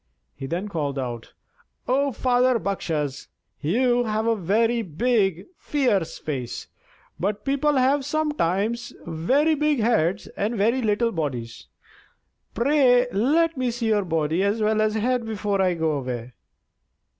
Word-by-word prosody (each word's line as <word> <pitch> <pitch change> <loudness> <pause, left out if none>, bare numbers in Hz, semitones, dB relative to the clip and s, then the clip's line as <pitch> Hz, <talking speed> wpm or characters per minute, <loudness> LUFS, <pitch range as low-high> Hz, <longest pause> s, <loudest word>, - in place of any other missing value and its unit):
He 135 - -7
then 175 +7 -3
called 150 -7 -3
out: 120 -3 -5 0.5
"O 275 +2 +2
father 250 +1 +2
Bakshas, 155 - -3 0.3
you 240 - +2
have 215 0 -1
a 230 0 +2
very 225 +5 +1
big, 195 -1 0
fierce 230 - 0
face; 130 -6 -5 0.5
but 200 +3 -2
people 280 +2 +1
have 270 +2 +3
sometimes 235 - -1
very 260 - +2
big 300 -2 +1
heads 210 -4 +1
and 215 +4 -1
very 230 +6 +2
little 225 +1 +1
bodies. 130 - -4 0.9
Pray 250 -1 +4
let 315 +10 +2
me 255 -2 -1
see 235 -1 -2
your 210 -2 +2
body 160 0 0
as 200 +3 +1
well 215 0 +2
as 215 0 +1
head 245 +3 0
before 210 -3 -1
I 185 -2 +2
go 160 -1 0
away." 125 -4 -4
215 Hz, 135 wpm, -24 LUFS, 165-250 Hz, 0.9 s, Pray